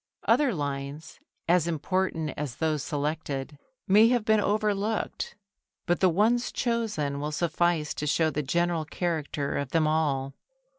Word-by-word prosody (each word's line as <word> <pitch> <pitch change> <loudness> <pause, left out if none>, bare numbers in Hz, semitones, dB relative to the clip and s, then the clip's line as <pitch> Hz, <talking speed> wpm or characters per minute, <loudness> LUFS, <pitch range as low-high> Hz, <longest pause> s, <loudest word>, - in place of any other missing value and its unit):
Other 290 -4 +3
lines, 145 0 -5 0.3
as 170 -1 +3
important 165 -1 -1
as 140 -5 -4
those 155 -2 0
selected, 145 -2 -3 0.3
may 210 +4 +7
have 240 -2 +1
been 220 -1 +4
overlooked, 210 +1 -1 0.5
but 175 - +1
the 185 - +5
ones 225 +8 +2
chosen 215 - -1
will 150 +1 -3
suffice 170 -1 0
to 150 - -4
show 160 +2 +2
the 150 - -1
general 170 +3 0
character 155 -4 -2
of 140 -2 -3
them 160 +1 +2
all. 145 -4 0
160 Hz, 140 wpm, -27 LUFS, 150-190 Hz, 0.5 s, may